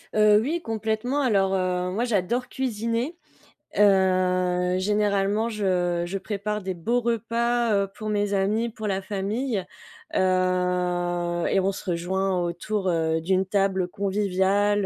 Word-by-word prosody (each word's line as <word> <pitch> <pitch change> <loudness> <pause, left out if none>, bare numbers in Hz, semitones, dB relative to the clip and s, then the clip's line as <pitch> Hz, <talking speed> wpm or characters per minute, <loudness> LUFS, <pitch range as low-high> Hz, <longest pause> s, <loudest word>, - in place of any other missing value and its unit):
Heu, 210 0 +6
oui, 325 +8 -2
complètement 225 +5 -1
alors, 195 -6 +2
heu, 180 -1 0
moi, 215 +6 -1
j'adore 240 +4 0
cuisiner. 235 +4 -2 0.6
Heu, 185 -2 +3
généralement 205 +2 +1
je 180 -5 0
je 195 +3 -3
prépare 210 +1 -3
des 190 - -2
beaux 230 +8 0
repas, 235 0 0
heu, 200 0 +1
pour 215 0 -5
mes 205 -1 0
amis, 210 +4 +1
pour 220 -1 -6
la 195 -1 -1
famille. 205 +2 -2 0.5
Heu 180 -2 0
et 195 - +3
on 190 +1 +1
se 195 0 -7
rejoint 185 +2 0
autour, 185 +3 -2
heu, 160 -1 +1
d'une 190 +3 +1
table 190 -1 +1
conviviale, 200 +1 +1
195 Hz, 135 wpm, -25 LUFS, 185-215 Hz, 0.6 s, Heu